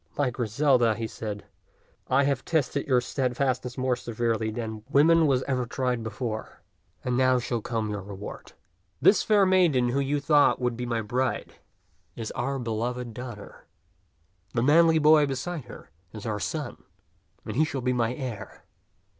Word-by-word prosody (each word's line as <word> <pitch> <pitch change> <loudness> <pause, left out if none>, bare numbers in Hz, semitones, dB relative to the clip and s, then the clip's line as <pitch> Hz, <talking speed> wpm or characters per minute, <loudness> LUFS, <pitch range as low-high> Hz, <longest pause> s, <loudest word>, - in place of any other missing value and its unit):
"My 140 -3 +1
Griselda," 120 0 +2
he 115 - -3
said, 105 -2 -6 0.6
"I 135 +2 +3
have 140 -2 0
tested 145 -3 -1
your 125 -3 +3
stead 125 0 -2
fastness 130 -2 -1
more 130 -1 +1
severely 115 -2 -2
than 110 -1 -5
woman 160 +3 +5
was 130 -2 +2
ever 125 -3 -1
tried 125 0 -1
before, 110 0 -5 0.4
and 125 -1 -1
now 130 0 +4
shall 120 -1 -2
come 110 -2 -2
your 100 -1 -4
reward. 100 +1 -9 0.5
This 205 - +5
fair 205 -2 +4
maiden 170 -10 +3
who 135 +3 0
you 140 +1 0
thought 145 0 +4
would 125 -2 -1
be 125 +1 -4
my 115 -1 -1
bride 125 +4 -2 0.6
is 115 -2 -5
our 135 +3 -2
beloved 120 0 -3
daughter. 120 -4 -9 0.9
The 115 - +2
manly 160 +3 +5
boy 150 -1 +5
beside 135 +3 -4
her - - -12 0.2
is 110 -2 -8
our 105 -2 -2
son, - - -4 0.6
and - - -5
he 150 - +4
shall 140 -4 -3
be 125 +1 +1
my 120 0 0
heir. 125 -6 -7
125 Hz, 165 wpm, -26 LUFS, 115-140 Hz, 0.9 s, woman